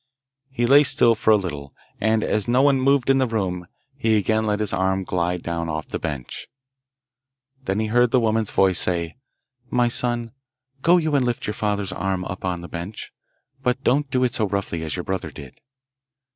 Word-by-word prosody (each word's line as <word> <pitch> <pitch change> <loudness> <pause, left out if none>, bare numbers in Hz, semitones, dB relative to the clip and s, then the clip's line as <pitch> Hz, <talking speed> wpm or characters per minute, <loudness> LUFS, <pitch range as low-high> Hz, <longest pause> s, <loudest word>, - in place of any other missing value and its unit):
He 120 -3 -1
lay 140 +4 +7
still 120 -4 +4
for 110 0 -1
a 110 - +8
little, 75 -8 -6 0.2
and, 110 +1 +1
as 105 -2 0
no 125 +3 +3
one 140 -2 +3
moved 135 -1 +2
in 135 0 +4
the 130 - +2
room, 95 -6 -2 0.3
he 115 -5 +2
again 110 +2 +1
let 105 0 0
his 105 -3 0
arm 95 0 0
glide 90 -1 -2
down 85 -1 -3
off 80 0 -4
the - - -4
bench. 70 -5 -5 1.2
Then 95 -1 -1
he 110 - 0
heard 120 +2 +2
a 130 - +4
woman's 110 -2 0
voice 95 -2 +2
say, 85 -1 -1 0.5
'My 120 -1 +2
son, 120 -1 -1 0.5
go 175 +4 +5
you 160 -3 0
and 140 -2 +3
lift 120 -1 -2
your 105 - -2
father's 105 -2 -2
arm 95 -1 -2
up 95 - -6
on 90 -2 -2
the 85 - -8
bench, 85 +6 -7 0.5
but 125 0 -1
don't 140 +3 +2
do 130 -1 +1
it 125 -2 +1
so 110 -3 0
rough!y 100 -4 -3
as 80 -1 -4
your 90 - -4
brother 95 -4 -3
did. 70 -3 -12
105 Hz, 200 wpm, -23 LUFS, 90-120 Hz, 1.2 s, a